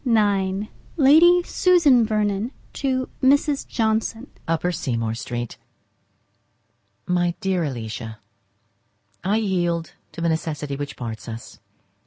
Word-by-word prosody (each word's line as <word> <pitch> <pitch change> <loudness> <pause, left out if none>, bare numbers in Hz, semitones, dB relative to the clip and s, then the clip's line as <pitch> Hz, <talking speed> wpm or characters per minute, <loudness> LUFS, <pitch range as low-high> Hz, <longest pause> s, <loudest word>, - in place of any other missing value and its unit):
XXXIX 205 -4 +1 0.3
Lady 335 +5 +6
Susan 310 -12 +4 0.7
to 260 -2 -1
Mrs. 280 +1 +3
Johnson. 225 +2 -1 0.2
Upper 165 +2 0
Seymour 115 -9 -2
Street. 120 -1 -5 1.5
My 175 -1 +1
dear 190 -2 0
Alicia,—I 115 - -7
yield 175 -6 -1 0.2
to - - -8
the 170 - +2
necessity 150 -3 -2
which 145 0 -6
parts 115 -1 -6
us. 115 0 -9
180 Hz, 95 wpm, -23 LUFS, -, 1.5 s, Lady